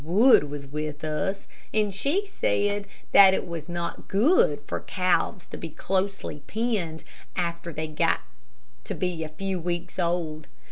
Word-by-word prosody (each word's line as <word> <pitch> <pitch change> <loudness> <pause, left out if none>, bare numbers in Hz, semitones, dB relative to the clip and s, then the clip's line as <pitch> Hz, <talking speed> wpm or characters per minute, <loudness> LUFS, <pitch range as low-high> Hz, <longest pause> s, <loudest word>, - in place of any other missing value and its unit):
Wood 195 - +6
was 145 -1 -6
with 150 +1 -5
us, 190 +6 -2 0.2
and 210 -2 +1
she 290 - 0
said 205 - 0 0.2
that 190 -1 +9
it - - -3
was 170 -1 -6
not 170 -1 -4
good 200 - +3
for - - -3
calves 185 0 0
to - - -8
be 165 - -6
closely 190 0 -2
penned 205 -8 -1 0.3
after 170 -1 -2
they 155 0 -3
got 155 -1 +1 0.6
to - - -3
be 180 -3 -2
a 155 - -5
few 190 +4 -3
weeks 175 +1 -3
old. 170 -3 -1
175 Hz, 150 wpm, -26 LUFS, 160-200 Hz, 0.6 s, that